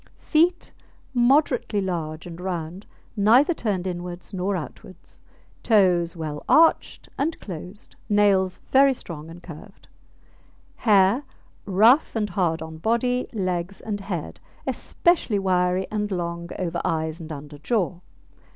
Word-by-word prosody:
FEET 345 +3 +1 0.4
Moderately 250 -3 +2
large 165 -5 -3
and 175 0 -9
round, 180 +1 -5 0.3
neither 235 - +5
turned 200 - -2
inwards 180 +1 -6
nor 190 +1 -1
outwards; 175 +1 -9 0.4
toes 180 -6 +3
well 155 -2 -5
arched 325 +1 +3
and 315 +4 -1
closed, 185 +2 -9
nails 200 -3 +3
very 270 0 +5
strong 160 -7 -9
and 170 +1 -12
curved. 185 +5 -12 0.9
HAIR 205 +3 +4 0.4
Rough 225 +11 +4
and 210 -3 -1
hard 170 -3 0
on 160 0 -9
body, 240 +5 0
legs, 185 -3 -2
and 210 -2 -4
head; 185 -6 -5 0.3
especially 340 - +1
wiry 185 -1 +1
and 210 -1 -1
long 170 -2 -4
over 170 -2 -2
eyes 160 +1 -2
and 160 0 -8
under 145 0 -8
jaw. 185 - -1
190 Hz, 125 wpm, -24 LUFS, 170-215 Hz, 0.9 s, neither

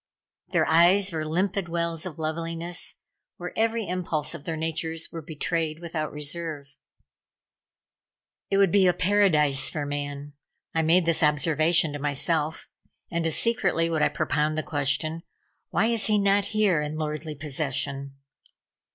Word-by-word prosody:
Their - - +2
eyes 180 +4 +5
were 160 -2 -2
limpid 185 +3 -1
wells 170 0 -1
of 165 -3 -9
loveliness, 165 +2 -4 0.4
where 180 0 -6
every 225 -1 0
impulse 170 -4 -1
of 155 -4 -9
their 165 -1 -3
natures 160 0 -3
were 165 - -6
betrayed 160 +1 -2
without 165 -3 -4
reserve. 150 -1 -5 1.7
"It 195 - +2
would 195 -3 +4
be 195 -1 +5
a 180 - +4
paradise 165 -8 +3
for 145 -2 -3
man." 145 0 -5 0.4
I 165 - +2
made 165 +2 +4
this 165 -1 +2
observation 155 +1 +3
to 145 - -5
myself, 150 +2 -1 0.4
and 170 -1 0
as 160 - +1
secretly 230 -8 +1
would 160 -2 0
I - - +4
propound 155 +1 0
the 155 - -1
question: 150 +1 -1 0.5
"Why 210 - +2
is 230 -1 +2
he 215 -1 +3
not 200 0 +3
here 200 -6 +2
in 150 +1 -4
lordly 155 0 -4
possession?" 140 -1 -3
160 Hz, 145 wpm, -26 LUFS, 150-175 Hz, 1.7 s, eyes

